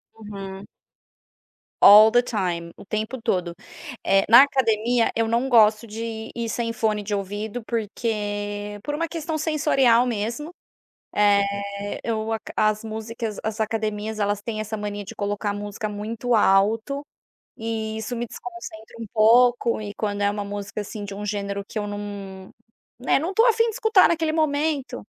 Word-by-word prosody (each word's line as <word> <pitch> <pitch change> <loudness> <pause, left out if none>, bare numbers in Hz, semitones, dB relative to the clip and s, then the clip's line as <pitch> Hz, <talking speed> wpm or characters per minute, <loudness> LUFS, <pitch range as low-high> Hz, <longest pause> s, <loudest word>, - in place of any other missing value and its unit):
Uhum. 200 -2 -8 1.2
All 215 +2 +9
the 245 0 +5
time, 180 -8 -3
o - - -13
tempo 220 +5 -4
todo, 175 -4 -1 0.5
eh, 195 0 +4
na 235 +3 +10
academia, 235 -3 +1
eu 225 0 +1
não 235 +3 +1
gosto 225 -2 +4
de 225 +1 -6
ir 235 -1 -3
sem 230 0 -2
fone 215 -2 0
de 205 0 -2
ouvido, 205 +4 -4
porque 205 -2 -3
por 295 - -3
uma 330 +2 -1
questão 320 -1 -4
sensorial 280 -6 +3
mesmo, 240 +8 -3 0.6
eh, 200 0 +1
eu 220 -1 -2
aca 220 -1 -4
as 215 +1 +1
músicas 220 0 -5
as 220 0 -3
academias, 215 0 -2
elas 205 0 0
têm 215 -1 -4
essa 215 0 -4
mania 205 -1 -4
de - - -9
colocar 205 0 -2
música 205 +1 -5
muito 220 +4 -3
alto 220 +7 +2 0.5
e 220 -1 -3
isso 230 +3 -4
me 240 +1 -3
desconcentra 230 -10 -10
um 225 - -6
pouco. 235 +2 +4
E 205 -1 -6
quando 205 -1 -2
é 200 - +3
uma 205 0 -4
música, 205 +1 -5
assim, 205 0 -6
de 200 -1 -7
um 205 +1 -6
gênero 200 -1 -3
que - - -4
eu 205 - -2
num, 200 -2 -7 0.5
né. 250 - +2
Não 345 +6 -3
tô 450 - +5
afim 460 0 +4
de 460 - -1
escutar 445 -5 +5
naquele 325 -2 0
momento, 290 -4 -1
220 Hz, 160 wpm, -23 LUFS, 205-240 Hz, 1.2 s, na